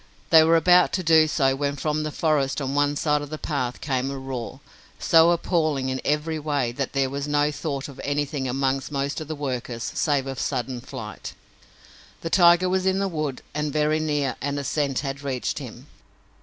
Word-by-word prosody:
They 160 Hz, -1 st, +8 dB
were 165 Hz, +1 st, +4 dB
about 180 Hz, +1 st, +5 dB
to 185 Hz, +1 st, -1 dB
do 160 Hz, -1 st, +5 dB
so 135 Hz, -3 st, +2 dB
when 140 Hz, 0 st, -1 dB
from 150 Hz, +1 st, -1 dB
the 155 Hz, 0 st, -3 dB
forest 150 Hz, -4 st, 0 dB
on 135 Hz, -1 st, -3 dB
one 145 Hz, 0 st, +2 dB
side 150 Hz, -1 st, +1 dB
of 145 Hz, -, -7 dB
the 155 Hz, -, -5 dB
path 130 Hz, -6 st, -3 dB
came 135 Hz, -2 st, -1 dB
a 140 Hz, -, -5 dB
roar, 130 Hz, -1 st, -6 dB, 0.4 s
so 165 Hz, 0 st, +5 dB
appalling 155 Hz, -6 st, 0 dB
in 130 Hz, 0 st, -3 dB
every 150 Hz, +2 st, -1 dB
way 145 Hz, -5 st, -1 dB
that 135 Hz, +2 st, -4 dB
there 135 Hz, -1 st, +1 dB
was 140 Hz, +1 st, -3 dB
no 145 Hz, 0 st, +2 dB
thought 145 Hz, -2 st, -4 dB
of 140 Hz, -, -10 dB
anything 145 Hz, -1 st, -2 dB
among 135 Hz, +1 st, 0 dB
most 140 Hz, +1 st, -2 dB
of 155 Hz, -, -7 dB
the 155 Hz, -, -4 dB
workers 125 Hz, -4 st, -4 dB
save 145 Hz, -3 st, +1 dB
of 135 Hz, -1 st, -5 dB
sudden 125 Hz, 0 st, -2 dB
flight. 105 Hz, -4 st, -8 dB, 0.9 s
The 165 Hz, -, -4 dB
tiger 175 Hz, 0 st, +5 dB
was 185 Hz, +1 st, 0 dB
in 190 Hz, 0 st, +2 dB
the 195 Hz, 0 st, 0 dB
wood 155 Hz, -7 st, -4 dB
and 150 Hz, 0 st, -2 dB
very 150 Hz, +1 st, +1 dB
near 145 Hz, -3 st, -1 dB
and 145 Hz, 0 st, -2 dB
a 140 Hz, -, -3 dB
scent 140 Hz, -2 st, -1 dB
had 140 Hz, 0 st, -5 dB
reached 135 Hz, -3 st, -3 dB
him. -, -, -9 dB
145 Hz, 200 wpm, -24 LUFS, 135-155 Hz, 0.9 s, They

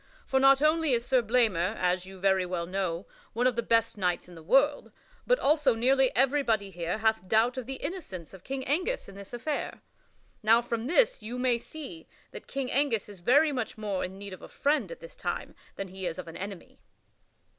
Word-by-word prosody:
For 265 Hz, -, +2 dB
not 270 Hz, +1 st, +6 dB
only 310 Hz, -2 st, +3 dB
is 235 Hz, 0 st, +1 dB
Sir 255 Hz, -1 st, +3 dB
Blamor, 215 Hz, -5 st, +2 dB
as 180 Hz, 0 st, 0 dB
you 190 Hz, 0 st, -11 dB
very 190 Hz, 0 st, +3 dB
well 180 Hz, -1 st, -3 dB
know, 185 Hz, -1 st, -2 dB, 0.3 s
one 240 Hz, +3 st, 0 dB
of 255 Hz, -2 st, +3 dB
the 235 Hz, -, +1 dB
best 230 Hz, -2 st, +1 dB
knights 180 Hz, -2 st, 0 dB
in 180 Hz, -, -13 dB
the 165 Hz, -, -11 dB
world, 270 Hz, -, +2 dB, 0.4 s
but -, -, +4 dB
also 295 Hz, -, +3 dB
nearly 260 Hz, +3 st, +3 dB
everybody 245 Hz, -6 st, +2 dB
here 175 Hz, +1 st, -3 dB
hath 220 Hz, -3 st, +1 dB
doubt 225 Hz, +5 st, +3 dB
of 255 Hz, -2 st, -5 dB
the 270 Hz, -, -4 dB
innocence 200 Hz, -, -6 dB
of 190 Hz, -2 st, -12 dB
King 265 Hz, -1 st, -4 dB
Angus 370 Hz, -, -1 dB
in 195 Hz, -, -11 dB
this 200 Hz, 0 st, -11 dB
affair. 280 Hz, +5 st, -3 dB, 0.6 s
Now 225 Hz, +2 st, +5 dB
from 235 Hz, 0 st, -3 dB
this 480 Hz, -, +3 dB
you 230 Hz, +4 st, -6 dB
may 250 Hz, -2 st, +2 dB
see 315 Hz, +5 st, -8 dB, 0.2 s
that -, -, -10 dB
King 275 Hz, -2 st, -3 dB
Angus 255 Hz, -7 st, +1 dB
is 200 Hz, -3 st, -11 dB
very 285 Hz, -, +4 dB
much 250 Hz, -5 st, -3 dB
more 205 Hz, -3 st, -2 dB
in 190 Hz, +1 st, -6 dB
need 200 Hz, -1 st, -8 dB
of 185 Hz, -, -10 dB
a -, -, -11 dB
friend 295 Hz, -, 0 dB
at -, -, -9 dB
this -, -, -11 dB
time -, -, -4 dB, 0.2 s
than 195 Hz, -1 st, -5 dB
he 190 Hz, 0 st, -5 dB
is 170 Hz, -, -4 dB
of 180 Hz, -2 st, -7 dB
an 165 Hz, -, -9 dB
enemy." 195 Hz, -2 st, -8 dB
230 Hz, 210 wpm, -29 LUFS, 190-270 Hz, 0.6 s, not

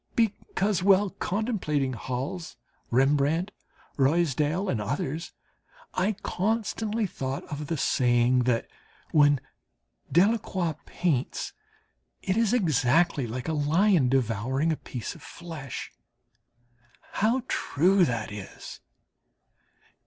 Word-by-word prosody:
Because, 210 Hz, -3 st, 0 dB
while 195 Hz, +1 st, +4 dB
contemplating 175 Hz, -, -1 dB
Hals, 130 Hz, +8 st, -4 dB, 0.3 s
Rembrandt, 145 Hz, -, +2 dB, 0.5 s
Ruysdael, 155 Hz, +4 st, +2 dB
and 120 Hz, -, 0 dB
others, 140 Hz, +8 st, -3 dB, 0.6 s
I 195 Hz, +4 st, +1 dB
constantly 220 Hz, +2 st, -1 dB
thought 135 Hz, -6 st, -4 dB
of 150 Hz, 0 st, -4 dB
the 165 Hz, -, -1 dB
saying, 125 Hz, -1 st, +3 dB
that 120 Hz, -2 st, +1 dB, 0.4 s
when 145 Hz, -2 st, +5 dB, 0.7 s
Delacroix 185 Hz, -, +2 dB
paints, 155 Hz, -8 st, -1 dB, 0.7 s
it 190 Hz, -, 0 dB
is 225 Hz, -2 st, +2 dB
exactly 155 Hz, -, +2 dB
like 125 Hz, +3 st, -5 dB
a 160 Hz, -, 0 dB
lion 155 Hz, 0 st, +3 dB
devouring 130 Hz, +4 st, +1 dB
a -, -, +1 dB
piece 125 Hz, -5 st, -6 dB
of -, -, -15 dB
flesh. 155 Hz, -7 st, -7 dB, 1.2 s
How 235 Hz, +5 st, +1 dB
true 180 Hz, +6 st, +3 dB
that 115 Hz, -9 st, -1 dB
is! 105 Hz, -2 st, -9 dB
155 Hz, 100 wpm, -27 LUFS, 130-190 Hz, 1.2 s, when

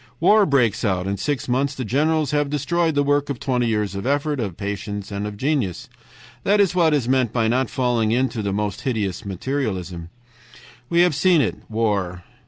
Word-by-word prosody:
"War 205 Hz, +4 st, +5 dB
breaks 125 Hz, -7 st, +2 dB
out. 95 Hz, -4 st, 0 dB
In 100 Hz, +1 st, -2 dB
six 125 Hz, +6 st, -2 dB
months 130 Hz, +3 st, 0 dB
the 130 Hz, -, -4 dB
generals 150 Hz, +4 st, +1 dB
have 145 Hz, -1 st, +1 dB
destroyed 160 Hz, +3 st, 0 dB
the 145 Hz, -, +3 dB
work 145 Hz, 0 st, +1 dB
of 135 Hz, -4 st, -3 dB
twenty 125 Hz, -3 st, 0 dB
years 105 Hz, -3 st, -1 dB
of 100 Hz, +4 st, -4 dB
effort, 145 Hz, +1 st, 0 dB
of 100 Hz, -7 st, -3 dB
patience, 100 Hz, 0 st, -5 dB
and 100 Hz, +1 st, -3 dB
of 105 Hz, -1 st, -7 dB
genius. 130 Hz, -, -1 dB, 0.5 s
"That 205 Hz, +1 st, +3 dB
is 195 Hz, -3 st, +3 dB
what 165 Hz, -4 st, +3 dB
is 130 Hz, -5 st, -1 dB
meant 130 Hz, -3 st, +2 dB
by 115 Hz, -2 st, +1 dB
not 130 Hz, +3 st, +1 dB
falling 120 Hz, -4 st, +1 dB
into 125 Hz, -1 st, 0 dB
the 100 Hz, -1 st, -2 dB
most 105 Hz, 0 st, -2 dB
hideous 110 Hz, -6 st, -2 dB
materialism. 95 Hz, -6 st, -3 dB, 0.8 s
"We 170 Hz, 0 st, +4 dB
have 175 Hz, -2 st, +4 dB
seen 170 Hz, +4 st, +4 dB
it, 130 Hz, -, 0 dB
war. 100 Hz, -6 st, -1 dB
125 Hz, 190 wpm, -22 LUFS, 105-145 Hz, 0.8 s, War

